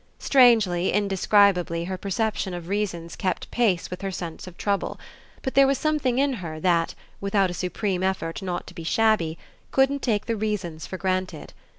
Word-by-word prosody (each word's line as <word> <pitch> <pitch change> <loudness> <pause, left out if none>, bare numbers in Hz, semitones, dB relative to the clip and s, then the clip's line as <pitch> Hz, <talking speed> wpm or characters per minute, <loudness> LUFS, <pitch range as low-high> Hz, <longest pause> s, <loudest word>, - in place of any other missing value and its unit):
Strangely, 220 -9 +4
indescribably 195 -3 +3
her 185 +2 -3
perception 200 0 -2
of 170 -1 -7
reasons 185 -5 -2
kept 185 -2 -3
pace 205 -9 +1
with 180 - -6
her 195 - -2
sense 175 -2 -6
of 180 - -11
trouble; 200 -1 -1 0.4
but 265 - -2
there 275 0 +6
was 275 0 +2
something 295 -5 0
in 275 0 +2
her 155 -2 -6
that, 170 -1 +1 0.2
without 200 -2 +1
a - - -5
supreme 185 +1 -2
effort 190 -3 -2
not 180 -2 -3
to - - -12
be 165 - -8
shabby, 175 -3 +2 0.3
couldn't 270 +1 +2
take 215 -4 0
the 230 - -1
reasons 200 -7 -3
for 185 - -5
granted. 185 -3 -2
190 Hz, 175 wpm, -25 LUFS, 175-220 Hz, 0.4 s, there